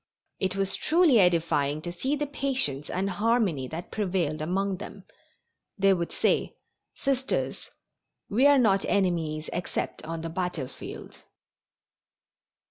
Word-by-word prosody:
It 190 0 0
was 195 0 0
truly 320 -7 +4
edifying 165 -5 +2
to 175 - -4
see 260 +12 -1
the 295 0 -1
patience 265 - -2
and 190 +2 -1
harmony 200 - +1
that 165 +6 -7
prevailed 175 -7 -1
among 190 +4 -1
them. 200 - -9 0.7
They 195 0 +5
would 170 -2 -2
say: - - +1 0.4
"Sisters, 270 -1 -1 0.6
we 250 +7 +4
are 285 -1 +6
not 200 -6 +3
enemies 165 -6 0
except 175 - -3
on 165 0 -5
the 165 - -4
battlefield." 170 -6 -5
185 Hz, 125 wpm, -27 LUFS, 165-225 Hz, 0.7 s, are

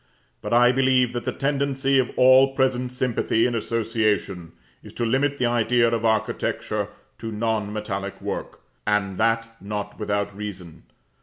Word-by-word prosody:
But - - -5
I 120 +1 +6
believe 130 -1 +2
that 120 - -4
the - - 0
tendency 140 -1 0
of 125 - +1
all 130 +1 +6
present 130 -2 +1
sympathy 125 -2 0
and 120 - 0
association 110 -6 -1 0.3
is - - -13
to 120 - -2
limit 135 +4 +1
the 125 - +1
idea 120 0 +2
of 115 -1 -1
architecture 110 -1 -1 0.3
to 115 0 -5
non 110 -1 -1
metallic 100 -2 -4
work; - - -5 0.3
and 95 -3 0
that 115 0 0
not 105 0 -5
without 100 -1 -2
reason. 95 -5 -8
115 Hz, 150 wpm, -24 LUFS, 105-125 Hz, 0.3 s, I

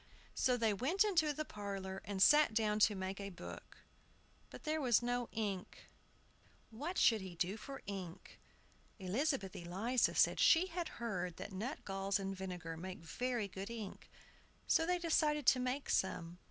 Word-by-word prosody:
So 250 -1 +2
they 225 -3 +2
went 300 - +2
into 335 -8 +2
the 305 +1 -3
parlor, 195 -3 -5
and 195 -2 +1
sat 295 -5 +6
down 215 -1 +2
to 210 0 +5
make 190 +1 -4
a 200 - -4
book. 180 - -10 0.7
But - - -11
there 310 0 -1
was 245 -3 +3
no 245 0 -1
ink. 205 -4 -4 0.8
What 295 +11 -4
should 225 -3 +5
he 185 -2 -8
do 180 +4 -1
for 270 +5 -8
ink? 185 -4 -7 0.6
Elizabeth 215 - -1
Eliza 200 +9 0
said - - +4
she 335 +2 +6
had 350 -2 -3
heard 180 -7 -3
that 205 - -7
nutgalls 195 -3 -2
and 195 -1 -4
vinegar 180 -3 -5
made 185 -1 -7
very 240 +5 -2
good 195 +2 -7
ink. 220 -4 -7 0.6
So 325 - +3
they 360 0 +2
decided 305 -4 +2
to 255 - +6
make 255 +3 -2
some. 175 -2 -1
215 Hz, 160 wpm, -36 LUFS, 190-270 Hz, 0.8 s, sat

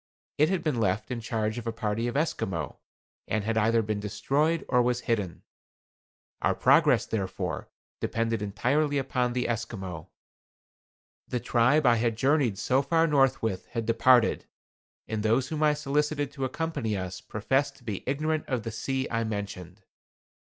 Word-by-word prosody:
It 155 +2 +5
had 190 -2 0
been 150 -7 0
left 105 +3 0
in 125 - -2
charge 110 0 -2
of 120 - -8
a - - 0
party 115 0 -2
of 120 - -2
Esquimaux, 95 - -2 0.5
and 110 0 0
had 115 +1 -1
either 115 +1 +3
been 105 -1 -2
destroyed, 145 +10 0
or 125 -1 +3
was 125 0 +1
hidden. 105 -9 -2 1.0
Our - - +2
progress, - - +4
therefore, 100 -4 -3 0.3
depended 115 -1 -1
entirely 140 +9 +1
upon 125 -2 0
the 125 0 0
Esquimaux. 95 -7 -4 1.2
The 125 - -2
tribe 125 +5 +3
I 120 -1 +5
had 115 0 +1
journeyed 135 -5 +2
so 130 +6 +2
far 165 +4 +2
north 135 -5 +3
with 95 -5 -2
had 115 -2 -3
departed, 115 +1 +4 0.6
and 110 -1 -2
those 115 +5 +2
whom 155 -1 -3
I 150 -1 +4
solicited 150 0 -1
to 135 -2 -3
accompany 130 -6 -2
us 95 0 -5
professed 130 +7 0
to 125 - -20
be 105 -5 -4
ignorant 155 +3 -1
of 125 -5 -1
the 115 - -4
sea 130 +4 -2
I 115 0 0
mentioned. 100 -3 -5
120 Hz, 160 wpm, -28 LUFS, 110-140 Hz, 1.2 s, It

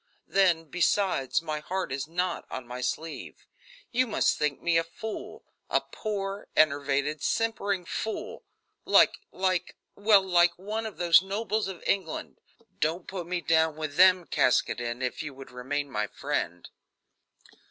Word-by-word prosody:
Then, 180 -4 +3
besides, 175 -4 +1
my 155 -2 -3
heart 185 0 -3
is 135 +2 -3
not 180 +2 -2
on 130 -1 -6
my 125 +1 -7
sleeve. 155 +6 -5 0.5
You 255 +1 +2
must 215 - +2
think 150 -2 -1
me 170 -1 +1
a - - 0
fool; 210 +6 -7 0.3
a - - +3
poor, 200 -2 -5
enervated, 145 0 +2
simpering 205 -5 0
fool 220 +5 -4 0.4
like - - +5
like 185 -1 -1 0.2
well, 205 -1 +5
like 175 -1 +4
one 215 +4 -3
of 215 - -9
those 175 0 +6
nobles 210 +2 -2
of 190 -3 -8
England. 185 -5 -2 0.4
Don't 165 +3 0
put 180 -3 -6
me 180 0 -2
down 160 -1 +2
with 155 -2 -5
them, 185 0 +6
Caskoden, 120 -2 +1
if 125 - -2
you 150 -3 -7
would 135 -1 -11
remain 140 +4 -3
my 105 -5 -2
friend." 85 -2 -3
170 Hz, 145 wpm, -28 LUFS, 145-195 Hz, 0.5 s, those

